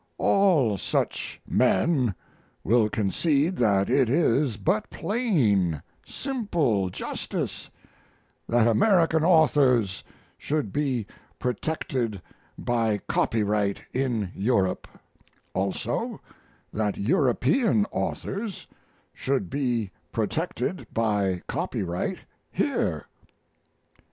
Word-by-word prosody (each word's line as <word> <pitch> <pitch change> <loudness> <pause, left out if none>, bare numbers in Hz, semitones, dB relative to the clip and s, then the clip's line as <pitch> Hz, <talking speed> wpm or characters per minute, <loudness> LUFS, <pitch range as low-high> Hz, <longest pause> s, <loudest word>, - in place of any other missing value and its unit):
All 155 - +3
such - - -2
men 125 - +2 0.5
will 110 -1 +3
concede 145 - +1
that 100 -4 +3
it 130 -1 +3
is 135 -4 +2
but 190 - 0
plain, 115 - +1 0.2
simple 170 - -1
justice - - -4 0.8
that 120 -1 +4
American 165 - +3
authors 140 - +3 0.4
should 145 -9 -2
be 130 -7 0 0.3
protected 125 -4 -2 0.4
by 115 -3 0
copyright 105 -2 0
in 120 -8 -1
Europe; 100 -3 0 0.7
also, 95 0 -2 0.5
that 105 -1 -1
European 145 - +2
authors 205 0 -3 0.5
should 135 0 -2
be 120 -7 -1 0.2
protected - - -2
by 100 -5 0
copyright 90 -1 -2 0.3
here. - - -1
120 Hz, 80 wpm, -26 LUFS, 105-155 Hz, 0.8 s, that